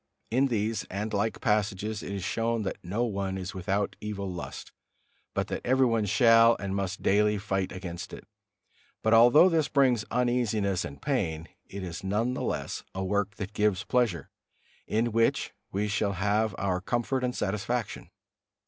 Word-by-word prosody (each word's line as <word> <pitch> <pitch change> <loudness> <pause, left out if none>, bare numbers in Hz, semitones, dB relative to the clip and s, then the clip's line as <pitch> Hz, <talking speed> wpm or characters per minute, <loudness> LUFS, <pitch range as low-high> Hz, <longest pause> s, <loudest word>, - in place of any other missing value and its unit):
In 130 +4 +3
these 110 -3 -1
and 105 +3 -4
like 105 +2 0
passages 105 0 0
it - - -6
is 100 -2 -4
shown 115 +3 -1
that 95 - -5
no 100 +7 -1
one 100 -4 -2
is 95 0 -5
without 100 +2 -1
evil 105 -2 -4
lust; 90 -2 -7 0.6
but - - +1
that - - -3
everyone 120 -4 +2
shall 115 +2 +6
and 100 -1 -3
must 95 -1 -3
daily 105 +1 +3
fight 95 -2 -2
against 90 -2 -6
it. - - -10 0.8
But 110 - +3
although 120 +9 +8
this 165 -4 +2
brings 130 -6 +3
uneasiness 115 -6 +1
and 70 0 -7
pain, 85 - -1 0.2
it 100 0 -7
is 90 +1 -6
none 105 +6 0
the - - -4
less - - -3
a 95 - -2
work 100 +1 -1
that 100 0 -6
gives 105 -2 +1
pleasure, 120 -9 0 0.6
in 115 +2 +1
which 115 +1 +1 0.2
we 100 +2 -1
shall 100 -1 0
have 105 +2 0
our 95 -2 -1
comfort 120 +5 -1
and 125 -1 -1
satisfaction. 105 +2 -2
105 Hz, 165 wpm, -28 LUFS, 95-115 Hz, 0.8 s, although